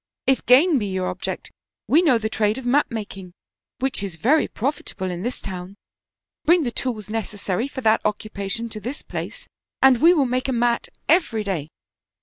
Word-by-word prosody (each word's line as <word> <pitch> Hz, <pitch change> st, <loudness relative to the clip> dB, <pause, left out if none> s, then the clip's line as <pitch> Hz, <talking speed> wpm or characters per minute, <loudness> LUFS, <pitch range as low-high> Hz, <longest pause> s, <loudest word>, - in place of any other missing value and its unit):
If 265 Hz, -1 st, +2 dB
gain 280 Hz, +4 st, +6 dB
be 205 Hz, -, -2 dB
your 185 Hz, -1 st, -1 dB
object, 185 Hz, 0 st, -5 dB, 0.4 s
we 320 Hz, -, +5 dB
know 300 Hz, -9 st, +4 dB
the 220 Hz, -1 st, -2 dB
trade 215 Hz, 0 st, 0 dB
of 265 Hz, -, -7 dB
mat 275 Hz, +4 st, +3 dB
making 195 Hz, -5 st, -6 dB, 0.4 s
which 265 Hz, -4 st, -1 dB
is 195 Hz, -4 st, -4 dB
very 270 Hz, -, +3 dB
profitable 220 Hz, -7 st, -3 dB
in 175 Hz, 0 st, -5 dB
this 245 Hz, +5 st, -3 dB
town; 185 Hz, 0 st, -7 dB, 0.7 s
bring 340 Hz, +1 st, +4 dB
the 240 Hz, -, -1 dB
tools 230 Hz, -5 st, -2 dB
necessary 210 Hz, 0 st, -2 dB
for 270 Hz, -1 st, -6 dB
that 220 Hz, -1 st, +3 dB
occupation 210 Hz, +1 st, -3 dB
to 215 Hz, -, -7 dB
this 250 Hz, +8 st, -5 dB
place, -, -, -6 dB, 0.3 s
and 260 Hz, -3 st, +5 dB
we 345 Hz, +2 st, +7 dB
will 285 Hz, -4 st, +3 dB
make 255 Hz, +1 st, -1 dB
a 265 Hz, -, 0 dB
mat 240 Hz, 0 st, +1 dB, 0.2 s
every 295 Hz, -, +3 dB
day.' 170 Hz, -7 st, -3 dB
230 Hz, 180 wpm, -23 LUFS, 200-265 Hz, 0.7 s, we